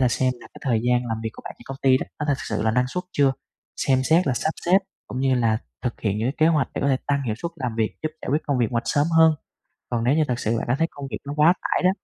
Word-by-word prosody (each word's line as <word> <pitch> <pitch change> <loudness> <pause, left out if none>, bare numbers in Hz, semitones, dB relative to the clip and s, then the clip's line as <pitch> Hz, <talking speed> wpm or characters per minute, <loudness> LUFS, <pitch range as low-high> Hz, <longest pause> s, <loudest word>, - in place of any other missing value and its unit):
là 130 - +4
xem 130 +1 +1
lại - - -14
cái - - -12
thời 115 -2 +2
gian 125 0 +2
làm 115 -1 -3
việc 110 - -2
của - - -12
bạn - - -6
trên - - -15
công 135 - -6
ty 130 -1 +5
đó, - - -5
có 150 - -2
thực 140 -2 +2
sự - - -1
là 110 - +2
năng 125 +3 +2
suất 180 +7 -4
chưa? 140 -2 +3 0.4
Xem 130 -1 +2
xét 160 +5 +4
là 135 - +2
sắp 155 - 0 0.2
xếp 180 +2 +6 0.3
cũng 130 - -5
như 135 -1 +3
là 115 -3 +2 0.2
thực 125 -3 -3
hiện 105 -1 0
những 110 - 0
cái 135 - -1
kế 155 - +5
hoạch 150 -4 +2
để - - -2
có 140 - +1
thể 135 - +3
tăng 140 -1 +1
hiệu 115 -5 -1
suất 170 - -3
làm 125 -6 -3
việc, 110 -1 -1
giúp 155 - 0
giải - - -6
quyết 150 +2 +1
công 140 -4 +1
việc 120 -3 +1
ngoạch 115 0 0
sớm 145 +1 +2
hơn. 160 0 +7 0.6
Còn 120 -1 -1
nếu 125 +4 +3
như 155 - +3
thực 125 -1 -1
sự 115 0 0
bạn - - -3
cảm 120 +3 +1
thấy 165 +2 +2
công 140 -1 -7
việc - - -2
nó 145 - -3
quá 155 +3 +6
tải - - 0
đó, 180 - +6
130 Hz, 325 wpm, -24 LUFS, 120-150 Hz, 0.6 s, hơn